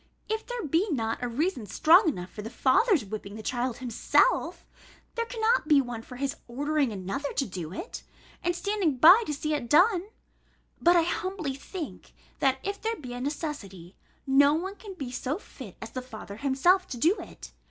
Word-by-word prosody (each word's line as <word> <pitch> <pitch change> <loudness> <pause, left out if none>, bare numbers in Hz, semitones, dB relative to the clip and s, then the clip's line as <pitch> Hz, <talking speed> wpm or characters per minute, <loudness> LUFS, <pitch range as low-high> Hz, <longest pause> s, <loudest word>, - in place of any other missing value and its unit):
If 440 +1 -3
there 485 -6 -4
be 330 +8 +1
not 225 -8 -1
a 245 - -1
reason 255 - -1
strong 330 - +5
enough 180 - -5
for 210 - -7
the 220 - -6
father's 265 - +3
whipping 205 0 -7
the 220 - -8
child 245 0 -2
himself, 250 - +1 0.5
there 465 -1 -2
cannot 460 -5 +1
be 295 -2 +6
one 245 -4 -3
for 250 - -11
his 275 +2 -3
ordering 285 +1 0
another 200 +8 -4
to 275 - 0
do 180 -6 -6
it, 350 - -6 0.4
and 350 0 0
standing 385 -7 0
by 350 - +8
to - - -1
see 305 +2 -2
it 265 -6 -3
done. 365 +4 +4 0.7
But 345 +1 +5
I 340 - +5
humbly 350 -3 -2
think, 310 +4 -8 0.3
that 265 -1 +3
if 400 +1 -4
there 450 +1 -1
be 255 - -8
a 245 - -5
necessity, 250 - -5 0.3
no 280 +2 +5
one 375 +5 -3
can 405 -3 -10
be 270 -7 -6
so 260 +4 -2
fit 255 - -12
as 225 - -8
the 255 - -4
father 220 -5 -9
himself 285 - +3
to 250 - -6
do 335 - +3
it. - - -10
285 Hz, 190 wpm, -28 LUFS, 245-360 Hz, 0.7 s, by